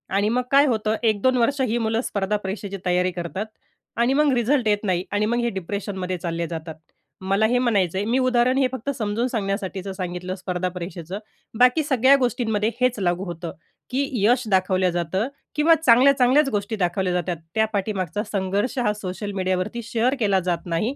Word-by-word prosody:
आणि 205 +2 +2
मग 250 +2 +1
काय 280 +1 +6
होतं. 220 -2 0
1-2 225 +4 +2
वर्ष 265 +4 +1
ही 240 -2 +1
मुलं 225 +1 0
स्पर्धा 205 -2 -1
परीक्षेची 195 0 -5
तयारी 180 +1 +2
करतात 175 +4 -4 0.5
आणि 235 +3 +2
मग 295 0 +3
रिझल्ट 245 0 +1
येत 210 0 +1
नाही. 185 -2 0
आणि 205 +1 +1
मग 235 +2 0
हे 235 0 +1
डिप्रेशनमध्ये 190 -1 -4
चालले 170 0 -3
जातात. 160 -1 -6 0.5
मला 195 +3 +2
हे 245 +2 +2
म्हणायचं 200 -8 +1
आहे, 200 - -1
मी 245 +4 +1
उदाहरण 255 0 +2
हे 265 -2 +3
फक्त 260 +2 -5
समजून 220 +2 -1
सांगण्यासाठीचं 195 -4 -3
सांगितलं 180 0 -4
स्पर्धा 180 -1 -3
परीक्षेचं. 180 +1 -6 0.4
बाकी 250 +5 +5
सगळ्या 265 -1 +4
गोष्टींमध्ये 230 -4 0
हेच 250 -3 +2
लागू 175 0 0
होतं, 170 -2 -6 0.4
की 270 +2 -1
यश 245 +3 +4
दाखवलं 185 -1 +2
जातं 175 +6 -1 0.3
किंवा 315 +2 +5
चांगल्या 275 -2 +5
चांगल्याच 270 +3 +4
गोष्टी 205 0 -2
दाखवल्या 180 -1 0
जातात 175 -1 -1 0.2
त्या 220 0 +3
पाठीमागचा 195 -1 -2
संघर्ष 200 +6 -1
हा 210 -4 +1
सोशल 205 0 -5
मीडियावरती 185 +5 -1
शेअर 235 +4 0
केला 200 -4 +2
जात 170 0 -2
नाही. 195 +11 -1
205 Hz, 180 wpm, -23 LUFS, 185-245 Hz, 0.5 s, काय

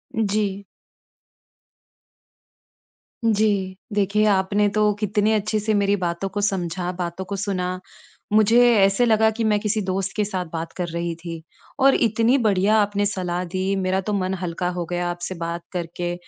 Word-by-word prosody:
जी। 205 -2 0 2.6
जी। 205 -4 +1 0.2
देखिए, 205 +1 +2
आपने 205 0 +2
तो 210 0 +2
कितने 210 +1 +1
अच्छे 215 0 0
से 215 +1 0
मेरी 200 -1 +2
बातों 170 +2 -2
को 205 +2 -3
समझा, 180 -3 -1
बातों 180 +1 -5
को 200 - -4
सुना। 185 -2 -2 0.5
मुझे 220 +2 +5 0.2
ऐसे 195 +4 +4
लगा 220 -1 +4
कि 225 +1 -3
मैं 210 -1 +2
किसी 215 +1 -1
दोस्त 190 0 -2
के 210 - +1
साथ 185 -3 -3
बात 165 0 -4
कर 180 -2 -2
रही 170 0 -3
थी। 165 -1 -8 0.4
और 270 0 +5
इतनी 230 +2 +3
बढ़िया 210 -3 +2
आपने 205 -1 +1
सलाह 180 -3 -2
दी 190 +1 0
मेरा 190 0 0
तो - - 0
मन 190 -1 -1
हल्का 180 0 -2
हो 175 - -2
गया 175 0 -1
आपसे 175 +1 -5
बात 170 0 -4
करके। 175 0 -3
195 Hz, 160 wpm, -22 LUFS, 180-210 Hz, 2.6 s, मुझे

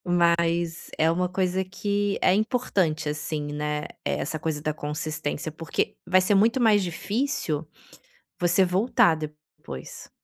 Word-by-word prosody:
Mas 170 -1 +1
é 160 +1 +4
uma 180 +2 0
coisa 185 0 0
que 200 +2 -1
é - - +5
importante 195 - 0
assim, 150 0 -3
né, 150 0 -2 0.2
essa 155 - -2
coisa 155 -1 -2
da 155 +1 -1
consistência, 150 0 -4
porque 165 +1 -2
vai 185 +1 +5
ser 185 +2 +2
muito 225 +6 +4
mais 220 -4 +5
difícil 185 - -2 0.7
você 175 +2 +3
voltar 180 -2 +3
depois, 150 - -9
170 Hz, 130 wpm, -26 LUFS, 155-190 Hz, 0.7 s, é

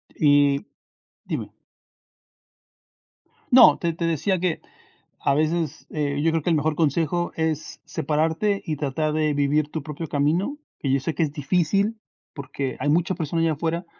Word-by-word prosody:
Y 145 +1 +3 0.6
Dime. - - -4 2.0
No. 255 - +8
Te 170 -1 -1
te 170 +1 -3
decía 165 +4 0
que 175 -2 -1 0.6
a 140 - +2
veces, 155 +1 -1
eh, 145 -2 -2
yo 165 - +3
creo 165 0 0
que - - 0
el 165 - +3
mejor 155 +1 0
consejo 165 +2 0
es 160 -1 -3
separarte 160 +8 0
y 155 -2 -2
tratar 150 +2 -1
de 155 -1 +1
vivir 145 +1 +1
tu 155 -1 -5
propio 155 +2 -6
camino. 160 - 0 0.2
Que 135 - -1
yo 135 - +3
sé 160 +4 -2
que 165 - 0
es 145 -2 -2
difícil, 180 +8 0 0.3
porque 135 -2 -5
hay - - -2
muchas 175 +4 +1
personas 165 0 -1
allá 165 -1 +2
afuera, 165 +3 -2
155 Hz, 160 wpm, -24 LUFS, 145-170 Hz, 2.0 s, No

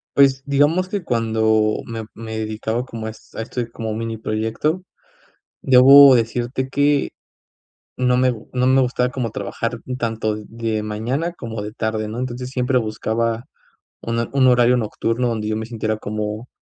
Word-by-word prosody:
Pues, 135 -1 +4
digamos 145 +6 +2
que 200 -2 -3
cuando 110 -3 +1
me 115 -1 -5
me 110 -1 -6
dedicaba 110 +2 -2
como 115 -3 -6
es 110 0 -11
a - - -3
esto 125 +2 -4
como 110 -2 -4
mini 115 +1 -4
proyecto, 110 +11 -2 0.8
debo 135 +1 +8
decirte 120 +2 -1
que, 145 +1 +2 0.9
no 125 -1 +2
me 130 0 +3 0.2
no 125 0 +1
me 130 +1 +5
gustaba 125 0 0
como 125 -2 -3
trabajar 115 +3 -4 0.2
tanto 110 -3 -1
de 110 0 -3
mañana 120 +11 -2
como 115 -9 -6
de 105 +1 -6
tarde, 110 -2 -2
¿no?, 110 +3 -5
entonces, 125 0 -4
siempre 130 0 0
buscaba 115 +1 -2 0.6
una 115 0 -2
un 135 -1 +4
horario 125 0 +5
nocturno 115 +1 -1
donde 110 -2 -2
yo 110 - -1
me 110 0 -4
sintiera 110 -2 -2
como 105 +2 -4
115 Hz, 155 wpm, -21 LUFS, 110-130 Hz, 0.9 s, debo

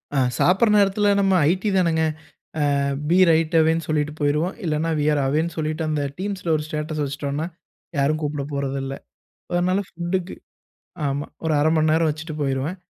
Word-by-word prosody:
அ - - +1 0.2
சாப்பிடுற 195 +5 +4
நேரத்தில, 200 +1 +2
நம்ம 195 -1 +3 0.2
ஐடி 190 +4 0
தானேங்க. 165 -3 +2 0.8
அ - - +1 0.3
பி 180 - +4
ரைட் 165 +1 +2
அவேன்னு 160 +1 +1
சொல்லிட்டு 150 -1 0
போயிருவோம். 150 +5 +1
இல்லன்னா, 155 +1 0
வி 145 - 0
ஆர் 145 - +1
அவேன்னு 160 +5 0
சொல்லிட்டு, 155 +1 -2
அந்த 150 -2 0 0.2
டீம்ஸ்ல 190 -4 -2
ஒரு 150 - -1
ஸ்டேட்டஸ் 155 0 -3
வச்சுட்டோன்னா, 140 +3 -3 0.5
யாரும் 150 +3 +2
கூப்பிடப் 145 -1 -3
போறதில்ல. 135 -1 -3 0.6
அதனால 180 +2 +2
ஃபுட்டுக்கு 175 +2 -3 0.7
ஆமா, 140 +1 -2 0.2
ஒரு 160 - +1
1/2 155 +2 +3
மணி 155 0 +3
நேரம் 160 0 +3
வச்சுட்டு 155 +1 -5
போயிருவேன். 140 +6 -1
155 Hz, 160 wpm, -22 LUFS, 145-175 Hz, 0.8 s, சாப்பிடுற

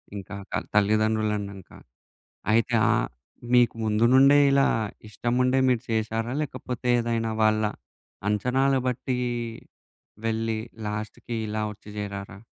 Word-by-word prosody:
ఇంకా 100 0 -7 0.2
త - - 0
తల్లిదండ్రులన్నంక. 105 -2 +1 0.8
అయితే, 115 +2 +2 0.2
ఆహ్, - - +1 0.5
మీకు 120 -2 +5
ముందు 110 +1 +2
నుండే 140 +2 +7
ఇలా 135 0 +4 0.4
ఇష్టముండే 125 +5 +1
మీరు 125 -2 +2
చేశారా? 115 +2 -1
లేకపోతే, 125 -4 -5
ఏదైనా 115 -1 -1
వాళ్ళ 110 0 +3 0.7
అంచనాల 130 +6 +2
బట్టీ 125 +1 -2 1.1
వెళ్లి 115 0 -1 0.3
లాస్ట్‌‌‌‌‌‌‌‌‌‌‌‌‌‌‌కి 105 +3 -5
ఇలా 110 +1 -2
ఒచ్చి 105 - -16
జేరారా? 100 0 -5
110 Hz, 105 wpm, -26 LUFS, 105-125 Hz, 1.1 s, నుండే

